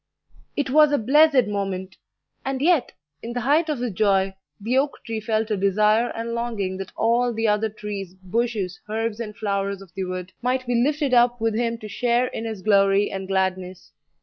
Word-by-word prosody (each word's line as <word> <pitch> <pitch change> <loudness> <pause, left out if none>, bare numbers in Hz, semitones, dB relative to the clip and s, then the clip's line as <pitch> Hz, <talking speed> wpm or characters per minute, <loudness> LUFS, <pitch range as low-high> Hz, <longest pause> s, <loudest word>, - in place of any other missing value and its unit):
It 285 -3 -1
was 300 +1 +6
a 290 - +3
blessed 280 +2 +5
moment! 195 -2 -3 0.5
and 270 0 -2
yet, 315 -2 +2 0.3
in 235 - -6
the 245 - -2
height 300 +6 +2
of 300 - 0
his 240 -3 -3
joy, 195 -1 +2 0.3
the 225 +5 -1
oak 280 +2 +1
tree 225 -1 -3
felt 220 0 -1
a - - +2
desire 210 +4 +3
and 230 +1 -4
longing 220 -6 -2
that 195 -1 -7
all 240 +2 +2
the 225 0 -1
other 210 +1 +1
trees, 205 -3 -7
bushes, 195 0 -2
herbs, 225 0 -2
and 210 -3 -6
flowers 200 -2 -2
of 195 -2 -15
the 190 - -3
wood 185 0 -6
might 255 +1 0
be 245 - -1
lifted 280 +3 +1
up 240 0 +4
with 225 0 0
him 230 +1 -1
to 215 - -9
share 240 +4 +1
in 230 - -5
his 220 -4 -5
glory 200 -1 +3
and 190 -1 -5
gladness. 185 -1 -2
220 Hz, 195 wpm, -23 LUFS, 195-245 Hz, 0.5 s, was